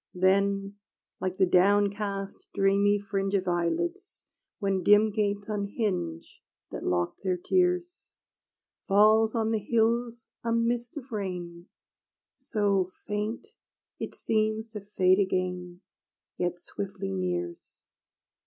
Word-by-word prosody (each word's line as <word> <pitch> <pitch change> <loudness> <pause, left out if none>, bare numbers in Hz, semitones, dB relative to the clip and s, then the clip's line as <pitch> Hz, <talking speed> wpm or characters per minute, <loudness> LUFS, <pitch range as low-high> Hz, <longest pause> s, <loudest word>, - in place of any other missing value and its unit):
Then, 195 +2 +2 0.4
like 185 0 -2
the 190 - +5
downcast 200 +1 +1
dreamy 200 +1 +3
fringe 195 -1 -2
Of 190 -1 0
eyelids, 340 - -2 0.3
when 195 -2 0
dim 210 +3 +5
gates 205 -1 -1
unhinge 200 - -3 0.3
That - - -6
locked 90 -1 -1
their 185 -2 0
tears, 360 - 0 0.7
Falls 215 +3 +5
on 225 -1 +1
the 220 - +1
hills 230 +2 0 0.2
a 230 - -1
mist 235 +5 0
of 270 -2 -8
rain, 180 -4 -5 0.7
So 200 -5 0 0.2
faint, 210 - -3 0.5
it - - -5
seems 220 0 0
to 215 -2 -7
fade 190 -2 +3
again; 180 -2 -1 0.5
Yet 175 0 -1
swiftly 185 - -5
nears. 90 -2 -4
200 Hz, 110 wpm, -28 LUFS, 185-220 Hz, 0.7 s, the